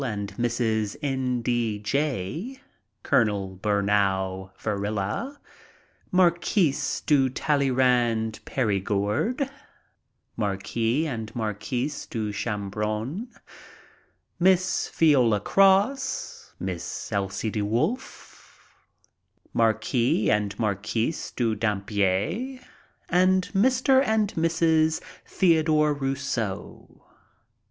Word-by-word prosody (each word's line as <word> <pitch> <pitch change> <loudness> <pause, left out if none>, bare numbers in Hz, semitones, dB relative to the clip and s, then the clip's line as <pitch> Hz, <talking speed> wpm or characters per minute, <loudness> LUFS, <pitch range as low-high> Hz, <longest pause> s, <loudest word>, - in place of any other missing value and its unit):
and 100 -5 -4
Mrs. 115 -3 0
N. 130 -3 -1
D. 115 -3 0
Jay, 140 - -2 0.4
Col. 100 -4 +1
Bunau 100 -2 0
Varila, 105 - -2 0.7
Marquise 175 -4 +2
de 135 -4 +3
Talleyrand 125 -5 +1
Perigord, 105 - 0 0.9
Marquis 115 +6 -1
and 110 -7 -4
Marquise 120 +6 -3
de 110 -3 -3
Chambrun, 105 - -3 1.1
Miss 185 0 +2
Viola 130 -10 +4
Cross, 205 - +2
Miss 90 -3 -5
Elsie 100 +2 -2
De 105 - -2
Wolf, 115 - -3 1.0
Marquis 115 0 +2
and 105 -1 0
Marquise 110 - -1
de 115 -3 +1
Dampierre, 105 - -1 0.5
and 185 +1 +3
Mr. 260 +5 +4
and 220 -5 +1
Mrs. 160 -1 +2 0.3
Theodore 155 -4 +3
Rousseau. 135 -7 -4
120 Hz, 75 wpm, -25 LUFS, 105-160 Hz, 1.1 s, Viola